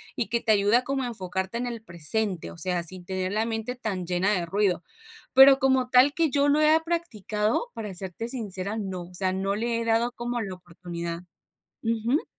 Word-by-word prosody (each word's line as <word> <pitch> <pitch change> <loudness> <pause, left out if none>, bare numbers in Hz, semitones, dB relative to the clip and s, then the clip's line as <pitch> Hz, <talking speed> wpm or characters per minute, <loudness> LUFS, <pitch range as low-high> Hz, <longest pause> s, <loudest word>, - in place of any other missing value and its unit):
Y 225 - -2
que 235 +1 +1
te 220 - +2
ayuda 210 +4 +4
como 275 +1 -2
a - - -2
enfocarte 190 -1 -3
en 245 - -2
el 230 -2 -5
presente. 180 +1 -2
O - - -12
sea, 175 +1 0
sin 180 +1 -5
tener 185 0 -2
la 215 +2 0
mente 225 +2 -3
tan 205 -7 -3
llena 180 +3 +1
de 180 -4 0
ruido. 185 -2 0 0.5
Pero 270 +1 +9
como 265 -1 +2
tal, 260 +3 +6
que 325 -2 +2
yo 285 +1 +2
lo 290 +1 +4
haya 310 +1 +5
practicado, 245 - -1
para 210 -4 -6
serte 190 +5 -5
sincera, 205 -4 -3
no. 190 -4 -4
O - - -17
sea, 185 0 0
no 195 +1 -1
le 230 +2 -1
he - - -3
dado 230 +1 +2
como 240 0 -3
la 195 -4 -4
oportunidad. 170 -1 -7 0.6
Ujú. 230 +5 0
215 Hz, 205 wpm, -26 LUFS, 185-245 Hz, 0.6 s, Pero